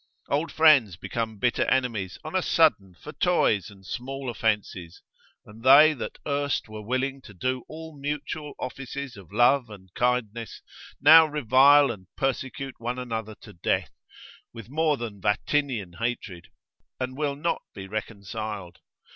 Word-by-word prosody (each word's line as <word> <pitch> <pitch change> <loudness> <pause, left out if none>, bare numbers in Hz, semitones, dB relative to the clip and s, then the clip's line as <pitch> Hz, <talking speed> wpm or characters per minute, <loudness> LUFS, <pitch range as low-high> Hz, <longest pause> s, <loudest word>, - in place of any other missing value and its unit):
Old 150 +4 0
friends 145 - +5
become 110 +4 -4
bitter 120 +3 +1
enemies 115 -8 -1
on 155 - -7
a 185 - +3
sudden 105 - +2
for 150 - -10
toys 140 - +1
and 95 -2 -17
small 130 +4 -5
offences, 105 -6 -2 0.4
and 105 +2 -14
they 145 +4 +8
that 140 - -6
erst 145 -3 -1
were 110 0 -8
willing 130 +4 -2
to 105 -6 -14
do 130 +7 -2
all 160 0 -9
mutual 145 +1 -5
offices 135 +1 -6
of 95 -3 -14
love 120 +3 +3
and 95 -4 -13
kindness, 120 -2 -2 0.4
now 160 +2 +8
revile 140 0 +5
and 95 -5 -10
persecute 135 -1 -3
one 120 +2 -3
another 110 -4 -5
to 105 - -13
death, 85 - -1 0.6
with 115 0 -11
more 155 -1 +1
than 110 -5 -7
Vatinian 110 -1 0
hatred, 110 -7 -4 0.5
and 130 0 -3
will 145 -1 -1
not 165 +4 -1
be 95 0 -8
reconciled. 105 -2 -6
125 Hz, 145 wpm, -26 LUFS, 105-140 Hz, 0.6 s, they